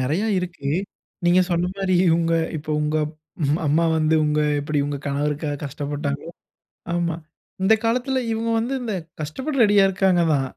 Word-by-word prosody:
நெறையா 155 +12 0
இருக்கு, 175 -6 -4 0.6
நீங்க 175 +1 +5
சொன்ன 175 +1 +1
மாரி 190 -2 0
இவங்க, 165 0 +2 0.2
இப்போ 155 0 -6
உங்க 150 +1 0 0.7
அம்மா 155 +4 +3
வந்து 155 0 +2
உங்க 150 0 +1 0.2
எப்படி 150 +1 -1
உங்க 145 0 -2
கணவருக்காக 145 +1 -1
கஷ்டப்பட்டாங்களோ. 145 +1 -4 0.6
ஆமா. 170 -1 0 0.5
இந்த 215 +4 +5
காலத்துல 250 +3 +1
இவங்க 225 +1 -1
வந்து 245 +4 -1
இந்த 225 -4 -2 0.3
கஷ்டப்பட 260 - -4
ரெடியா 205 -2 +5
இருக்காங்க 185 -2 +2
தான். 135 -2 0
165 Hz, 140 wpm, -23 LUFS, 150-195 Hz, 0.7 s, நீங்க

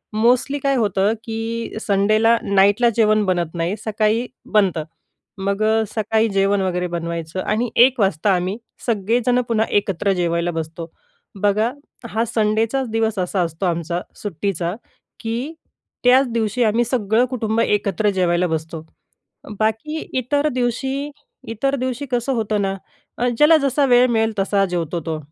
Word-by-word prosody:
Mostly 250 +5 +2
काय 275 0 +1
होतं, 205 -2 +1
की 225 +1 -4
संडेला 215 +3 +3
नाईटला 200 +4 +4
जेवण 215 -2 +3
बनत 175 -3 -1
नाही, 170 +4 -1
सकाळी 220 +2 0 0.3
बनतं. 190 -7 +2 0.6
मग 200 +2 -1
अ, 220 +1 +3
सकाळी 220 +1 +1
जेवण 195 0 +1
वगैरे 180 -1 -1
बनवायचं 170 0 -4
आणि 225 +3 -1
एक 260 -2 +1
वाजता 195 0 +2
आम्ही 180 +3 -1 0.3
सगळेजण 235 +3 +1
पुन्हा 225 -1 +1
एकत्र 195 -1 -1
जेवायला 170 -1 0
बसतो. 165 0 -6 0.5
बघा 210 +3 +2 0.4
हा 225 +2 0
संडेचाच 225 +3 0
दिवस 225 -2 0
असा 185 +1 -1
असतो 170 +3 -3
आमचा 170 0 -1 0.2
सुट्टीचा, 180 -2 -2 0.5
की 235 +7 -3 0.5
त्याच 260 +2 +6
दिवशी 230 +1 0
आम्ही 225 +3 +2
सगळं 230 -1 +1
कुटुंब 230 -3 -1
एकत्र 205 -1 +1
जेवायला 180 -1 +2
बसतो. 160 0 -4 0.7
बाकी 220 +9 -1
इतर 285 +4 +1
दिवशी 265 +3 -2 0.4
इतर 270 +5 -1
दिवशी 255 +2 -3
कसं 245 +2 0
होतं 215 -2 0
ना, 195 0 -1 0.6
ज्याला 315 +2 +7
जसा 280 -1 +1
वेळ 245 0 +5
मिळेल 225 -1 +1
तसा 195 0 +2
जेवतो 170 -1 -2
तो. 160 -1 -2
215 Hz, 135 wpm, -20 LUFS, 185-235 Hz, 0.7 s, ज्याला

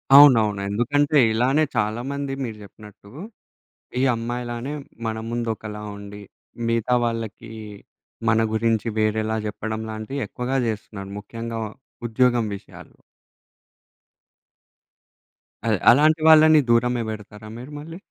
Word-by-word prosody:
అవునవును. 115 -8 +7
ఎందుకంటే, 145 +8 +2
ఇలానే 130 +7 +2
చాలామంది 130 +6 -2
మీరు 115 -4 -5
జెప్పినట్టు 105 0 -14 0.9
ఈ - - +2
అమ్మాయిలానే 120 +3 -4 0.3
మన 110 0 -2
ముందు 120 0 -2
ఒకలా 105 -1 -8
ఉండి, 100 0 -9 0.5
మిగతా 115 +1 +1
వాళ్ళకి 115 -1 -4 0.8
మన 110 +1 +3
గురించి 110 0 +1
వేరేలా 110 0 +1
జెప్పడం 110 +1 -4
లాంటివి 110 +6 -5
ఎక్కువగా 130 +2 -2
జేస్తున్నారు. 105 -3 -5
ముఖ్యంగా 115 +2 -6 0.5
ఉద్యోగం 120 0 +2
విషయాల్లో. - - -15 2.7
అది - - +2
అలాంటి 155 +5 +4
వాళ్ళని 155 0 +8
దూరమే 120 +1 +3
బెడతారా 105 0 -8
మీరు 125 +5 -9
మళ్ళీ? 165 +3 -9
115 Hz, 105 wpm, -23 LUFS, 110-125 Hz, 2.7 s, వాళ్ళని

